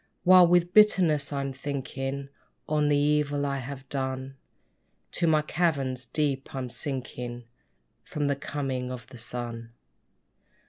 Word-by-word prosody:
While 185 -1 +8
with 175 0 +3
bitterness 180 -9 +4
I'm 140 -1 -2
thinking 135 0 -4 0.4
On 150 -1 +2
the 145 - +4
evil 145 0 +1
I 140 -1 -1
have 135 +1 -7
done, 130 0 -3 0.8
To 170 - 0
my 155 -1 +4
caverns 140 -6 0
deep 140 -3 -1
I'm 130 -2 -3
sinking 125 -3 -5 0.6
From 150 -1 -3
the 140 0 +1
coming 135 -3 -3
of 125 -2 -7
the 130 -2 -11
sun. 115 -1 -6
140 Hz, 130 wpm, -27 LUFS, 130-150 Hz, 0.8 s, While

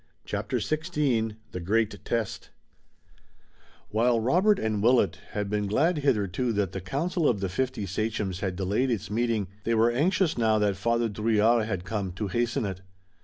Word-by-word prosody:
CHAPTER 105 +4 -2
XVI 140 - 0 0.2
THE 90 - -5
GREAT 105 +5 0
TEST 115 -4 -3 1.4
While 115 +2 +2
Robert 180 - +3
and 110 - -1
Willet 115 -5 +3
had 105 -1 -2
been 105 0 -1
glad 155 - +2
hitherto 120 -4 +1
that 100 -3 0
the 95 - -5
council 155 - 0
of 110 - 0
the 95 -1 -2
fifty 130 +2 -2
sachems 100 -1 -2
had 95 -3 -2
delayed 100 +8 0
its 110 -4 -2
meeting, 115 -3 0 0.2
they 115 - +1
were 115 +2 +4
anxious, 170 +3 +1
now 110 -1 +3
that 105 -2 +1
Father 115 +4 +1
Drouillard 110 +1 +2
had 95 -4 -3
come, 95 -2 -3
to 100 +2 -3
hasten 120 +1 0
it. 95 -2 -5
110 Hz, 165 wpm, -27 LUFS, 100-125 Hz, 1.4 s, were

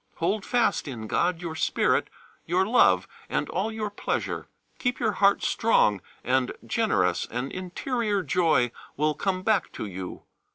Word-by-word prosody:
Hold 195 +5 -1
fast 245 -9 +1
in 120 -5 -5
God 175 +9 0
your 165 -2 -4
spirit, 160 - +1 0.4
your 180 +3 +2
love, 95 - +4 0.2
and - - -1
all 200 +5 -1
your 215 -2 -3
pleasure. 205 - -3 0.3
Keep 245 0 -1
your 225 -4 +2
heart 200 -1 +3
strong 105 - +3 0.2
and 130 0 +1
generous, 210 - +1
and 125 +3 -3
interior 205 +3 -2
joy 155 -7 +2 0.3
will 150 +1 +2
come 185 +2 -2
back 215 -1 +1
to - - -5
you. 95 -2 -7
180 Hz, 150 wpm, -26 LUFS, 130-215 Hz, 0.4 s, love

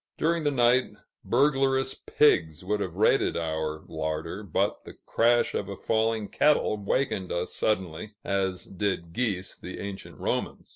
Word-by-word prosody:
During 165 0 +1
the - - +4
night, 125 -1 +3 0.3
burglarious 135 0 +2
pigs 85 - +2
would 105 +2 0
have 95 -4 -3
raided - - +3
our 80 -1 -2
larder, 80 +4 -3
but 100 -6 -1
the - - -10
crash 120 +1 +2
of 100 - -2
a 100 - -4
falling 110 0 0
kettle 150 -4 +3
wakened 100 -4 0
us 85 +1 -2
suddenly, 95 -1 -2
as 95 -2 -1
did 95 -4 -3
geese 100 -6 -2
the 90 - -8
ancient 100 -1 -7
Romans. - - -3
100 Hz, 145 wpm, -27 LUFS, 90-120 Hz, 0.3 s, the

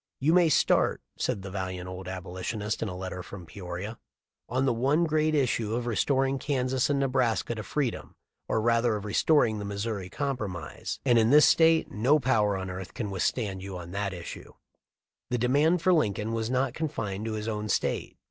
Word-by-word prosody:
"You 150 +5 +3
may 175 -2 +5
start," - - +3 0.2
said 95 - -2
the 95 - -7
valiant 95 -1 -4
old 95 0 -7
Abolitionist 95 +3 -4
in 110 - -1
a 90 - -6
letter 95 -1 -5
from 90 0 -9
Peoria,* 95 +4 -7 0.5
"on 130 +2 +1
the 130 - +2
one 135 +8 +2
great 155 -1 +2
issue 115 -5 +1
of 120 0 -2
restoring 135 +3 +1
Kansas 130 -2 0
and 140 -1 +2
Nebraska 130 -4 +1
to 110 - -5
freedom, 130 +2 -3 0.3
or - - +1
rather 115 0 +2
of 105 -1 -5
restoring 110 0 +3
the 100 - -4
Missouri 100 -1 -3
Compromise, 105 - -4
and 120 -3 +5
in 110 0 +3
this 150 +3 +7
State 165 0 +4
no 125 +8 +3
power 110 -7 +2
on 95 -1 -4
earth 90 +1 -7
can 105 -4 -3
withstand 95 0 -1
you 95 -1 -6
on 90 -1 -8
that 100 0 -2
issue." 90 -2 -8 0.8
The 125 - 0
demand 145 +8 +2
for 185 - +5
Lincoln 110 - +1
was 115 0 -1
not 130 0 +1
confined 110 -11 -3
to 110 - -2
his 110 0 -4
own 105 -1 -3
State. - - -1
110 Hz, 185 wpm, -28 LUFS, 100-135 Hz, 0.8 s, this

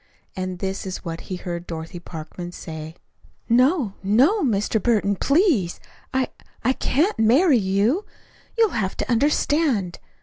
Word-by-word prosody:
And 185 -1 -3
this 190 +1 -4
is 185 0 -6
what 165 0 -5
he 185 - -2
heard 175 -1 -5
Dorothy 165 +1 -6
Parkman 170 +1 -8
say: 160 -1 -8 0.5
"No, 255 - +3
no, 260 - +3
Mr. 220 - +1
Burton, 205 -3 +2
please 275 - +2 0.3
I 260 -1 0 0.3
I 255 +3 +3
can't 315 - 0
marry 255 +5 +5
you. 205 - +1 0.5
You'll 450 -2 +4
have 195 -4 -2
to - - -2
understand. 275 - +1
210 Hz, 135 wpm, -23 LUFS, 180-270 Hz, 0.5 s, marry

